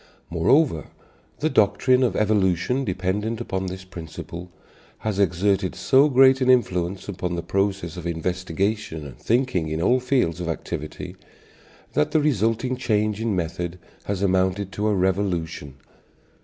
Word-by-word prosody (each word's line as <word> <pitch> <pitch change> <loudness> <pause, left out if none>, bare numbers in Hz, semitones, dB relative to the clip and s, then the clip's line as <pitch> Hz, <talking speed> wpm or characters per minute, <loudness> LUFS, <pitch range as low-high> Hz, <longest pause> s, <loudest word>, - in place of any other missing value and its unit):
Moreover, 85 - +2 0.5
the 155 - +2
doctrine 125 +5 +3
of 125 - +2
evolution, 105 +4 +1
dependent 100 +3 -2
upon 95 -5 -3
this 95 +1 -6
principle, 85 0 -8 0.5
has 105 -3 -3
exerted 95 +1 +1
so 130 +10 +4
great 130 0 +6
an 130 - +2
influence 95 -7 +1
upon 90 -3 -3
the 85 - -3
process 95 -4 -1
of 85 -1 -5
investigation 90 +1 -2
and 65 -4 -11
thinking 115 -9 +1
in 80 +1 -2
all 125 +9 +3
fields 125 - 0
of 85 - -3
activity 80 - -5 0.8
that 75 - +2
the 155 - +2
resulting 125 -2 +1
change 105 -3 0
in 115 -3 0
method 85 0 -3 0.3
has 100 -1 -2
amounted 95 +1 +1
to 105 +2 -1
a 105 - +2
revolution. 90 -7 -1
95 Hz, 140 wpm, -24 LUFS, 90-115 Hz, 0.8 s, great